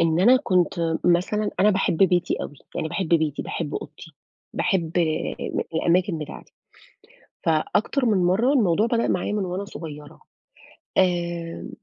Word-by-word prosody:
إن 165 0 +2
أنا 240 +7 +7
كنت 175 - +1
مثلًا 185 +4 +2
أنا 205 +2 +5
باحب 190 -4 +1
بيتي 180 -1 +3
أوي - - -7 0.2
يعني 155 - -2
باحب 185 +2 -3
بيتي، 155 -3 +1
باحب 150 -3 -4
أوضتي، 155 +2 -8 0.4
باحب 170 -4 0 0.8
الأماكن 170 +1 +1
بتاعتي. 150 -1 -9 0.9
فأكتر 205 - +1
من 215 -4 +3
مرّة 190 +10 +2
الموضوع 210 -4 +3
بدأ 235 0 +1
معايا 185 +3 -1
من 205 -2 -1
وأنا 185 +2 -4
صغيرة. 150 -5 -9 0.8
آمم 190 - +7
آآ 170 -1 -4
175 Hz, 135 wpm, -24 LUFS, 165-200 Hz, 0.9 s, أنا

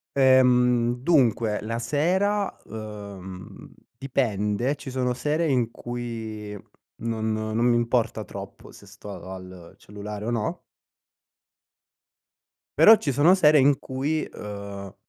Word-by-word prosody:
Ehm, 125 -2 +4
dunque, 120 -8 +2
la 115 +2 -3
sera, 185 - 0
ehm, 100 -4 -9 0.2
dipende, 120 -1 -1
ci 140 - -9
sono 125 -1 0
sere 150 +6 0
in 125 -4 +1
cui 115 -4 -6 0.5
non 110 -1 -1
non 110 0 -2
mi 120 -1 +4
importa 115 -2 0
troppo - - -10
se - - -15
sto - - -12
a 95 +2 -8
al 90 -2 -12
cellulare 105 +1 -8
o - - -2
no 120 +9 -2 2.2
però 220 - +9
ci 145 - -2
sono 150 +8 +5
sere 155 -5 +5
in 140 0 +4
cui, 140 +4 -2
ehm, 100 -1 -8
120 Hz, 120 wpm, -25 LUFS, 105-135 Hz, 2.2 s, però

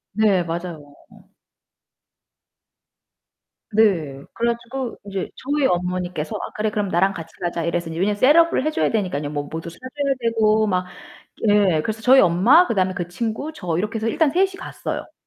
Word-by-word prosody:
네 205 -5 +3
맞아요. 165 -4 -6 2.8
네 170 -11 +2
그래 235 0 +1
가지고 240 +1 -6
인제 195 -2 -4
저희 285 +1 -1
어머니께서 180 -4 -1
"아 - - -5
그래 215 0 0
그럼 205 -2 -2
나랑 190 +3 +2
같이 165 -1 -9
가자." 170 -1 -2
이래서 170 0 -2
이제 160 - -6
왜냐면 205 +2 +1
셋업을 300 +4 +4
해 - - +2
줘야 155 - 0
되니까요. 180 -9 -1
뭐 145 -1 -2
뭐도 165 +3 -6
사 165 - -15
줘야 275 +2 -2
되고 220 -2 +2
막. 180 -2 0 0.6
예 195 -7 +3
그래서 220 0 -4
저희 260 +3 +6
엄마, 230 - +5
그다음에 185 -3 0
그 175 -3 -4
친구, 230 - -4
저 175 - -3
이렇게 210 +5 -2
해서 225 +1 -1
일단 300 +5 +2
셋이 380 +3 +2
갔어요. - - -6
200 Hz, 335 characters per minute, -22 LUFS, 170-235 Hz, 2.8 s, 저희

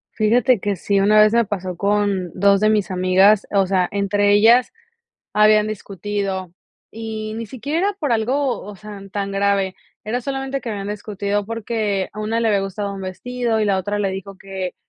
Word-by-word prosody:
Fíjate 235 +2 +3
que 205 0 -1
sí. 200 +3 0
Una 210 +2 +5
vez 215 +1 +5
me 235 0 +4
pasó 185 -3 -4
con 200 -2 0
2 200 +1 +4
de 215 0 +3
mis 210 -2 +1
amigas, 185 +3 +4
o 195 -2 +3
sea, 185 -1 +1
entre 205 0 +1
ellas 230 +4 +5 0.6
habían 215 0 +4
discutido 195 -2 -4 0.4
y 220 -1 -6
ni 230 0 -5
siquiera 280 +8 -3
era - - -1
por 290 -4 -1
algo, 255 +4 0
o 205 +1 -9
sea, 210 0 -10
tan 200 -1 -2
grave. 195 -1 0 0.3
Era 240 +4 -2
solamente 270 +1 -3
que 230 - -5
habían 200 -1 -4
discutido 205 -1 -3
porque 220 -4 -2
a 210 - -10
una 220 +2 -1
le 225 - +2
había 200 -2 +2
gustado 200 +1 -4
un 195 - -7
vestido 230 +4 -2
y - - +2
la 195 -2 +1
otra 205 +2 -2
le 195 - +1
dijo 195 0 -7
que, 190 -2 -6
205 Hz, 190 wpm, -20 LUFS, 195-220 Hz, 0.6 s, Una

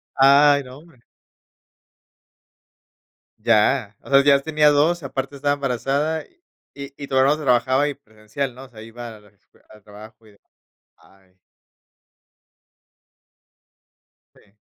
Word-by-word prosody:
Ay 140 +1 +5
no, 130 +1 -13
hombre. 150 -7 -21 2.4
Ya, 110 0 +1
o - - -15
sea, 135 0 +5
ya 140 -1 +4
tenía 150 0 +2
2, 160 +4 +1
aparte 135 +1 -5
estaba 145 +1 0
embarazada 140 +4 -2
y 350 - -30 0.4
y 140 0 -9
todavía 135 +2 +2
no 155 - -9
trabajaba, 130 +2 +1
y 145 - -3
presencial, 120 +1 -7
¿no?, 130 +1 -12
o - - -15
sea, 110 -2 -14
iba 120 +1 -10
a 105 - -18
la 105 0 -23 0.4
al 105 -1 -18
trabajo 110 +2 -15
y - - -18
demás, 100 - -31 0.5
ay. 95 -1 -27 3.0
Sí. 100 - -26
135 Hz, 125 wpm, -21 LUFS, 110-145 Hz, 3.0 s, Ay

